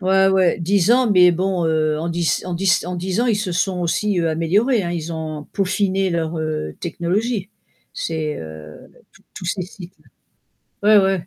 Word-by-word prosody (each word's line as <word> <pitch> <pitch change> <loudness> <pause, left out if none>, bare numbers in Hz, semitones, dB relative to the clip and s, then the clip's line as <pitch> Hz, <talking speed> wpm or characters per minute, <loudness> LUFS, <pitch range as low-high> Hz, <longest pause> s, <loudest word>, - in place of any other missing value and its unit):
Ouais, 190 +1 +3
ouais 190 -2 +3
10 185 +3 +2
ans, 250 -2 +3
mais 180 -2 +6
bon, 180 0 0
heu, 155 -1 +1
en 170 - -3
10 170 -1 0
en 180 - -3
10 175 -1 +1
en 180 - -3
10 185 +4 -2
ans, 245 - +1
ils 220 -3 +2
se 200 -4 -2
sont 180 +1 -1
aussi, 185 +3 0
heu, 165 -1 +1
améliorés, 200 +9 +1
hein. 175 - -3
Ils 170 -1 -4
ont 155 -2 -5
peaufiné 195 0 0
leur, 165 -1 -2
heu, 155 - -3
technologie. 195 +5 -2 0.4
C'est, 155 -2 -3
heu, 80 -1 -10 0.3
tous - - -22
tous 180 - -8
ces 185 +2 -2
sites-là. 180 0 -10 0.8
Ouais, 210 0 +7
ouais, 190 -3 0
180 Hz, 185 wpm, -20 LUFS, 165-195 Hz, 0.8 s, Ouais